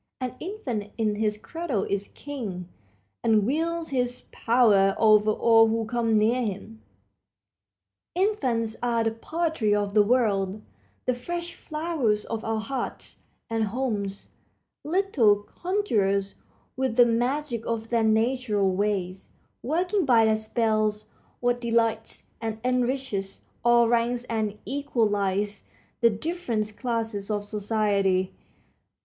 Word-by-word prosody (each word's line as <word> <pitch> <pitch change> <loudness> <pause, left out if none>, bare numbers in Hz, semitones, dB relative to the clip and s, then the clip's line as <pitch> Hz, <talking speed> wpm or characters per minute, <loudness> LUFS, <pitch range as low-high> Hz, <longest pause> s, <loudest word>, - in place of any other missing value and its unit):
An 255 -2 -3
infant 250 - -4
in 220 -2 +1
his 210 0 -1
cradle 280 - -3
is 200 0 -2
king, 215 -12 -6 0.6
and 215 -3 +3
wields 330 +5 -1
his 250 -2 -2
power 210 -5 +3
over 215 -1 +5
all 225 +1 +5
who 225 0 0
come 230 -1 +1
near 230 +4 +3
him. 220 0 -5 1.3
Infants 260 - 0
are 235 -1 +1
the 225 - +1
poetry 310 -2 -1
of 205 -1 -1
the 210 - +6
world; 205 -3 +1 0.4
the 255 - +2
fresh 345 +8 -5
flowers 305 -10 -1
of 225 -1 -4
our 225 0 -1
hearts 250 +3 -5 0.3
and 225 -1 0
homes; 205 -4 -3 0.5
little 305 - +3
conjurers, 205 - -1 0.4
with 260 -3 -1
the 245 0 +7
magic 240 +1 0
of 225 -1 -3
their 235 -1 +2
natural 220 -2 +2
ways, 190 -1 -2 0.3
working 355 - 0
by 235 -5 +5
their 220 0 +3
spells 215 -1 0 0.3
what 245 0 +1
delights 230 -2 0 0.2
and 225 -1 -3
enriches 250 -6 -1 0.2
all 240 0 +5
ranks 240 +1 +1
and 220 -3 -2
equalizes 210 -6 -1 0.3
the 235 - +5
different 225 -4 -3
classes 225 -5 -3
of 205 -1 -1
society. 205 -3 0
225 Hz, 120 wpm, -26 LUFS, 210-255 Hz, 1.3 s, the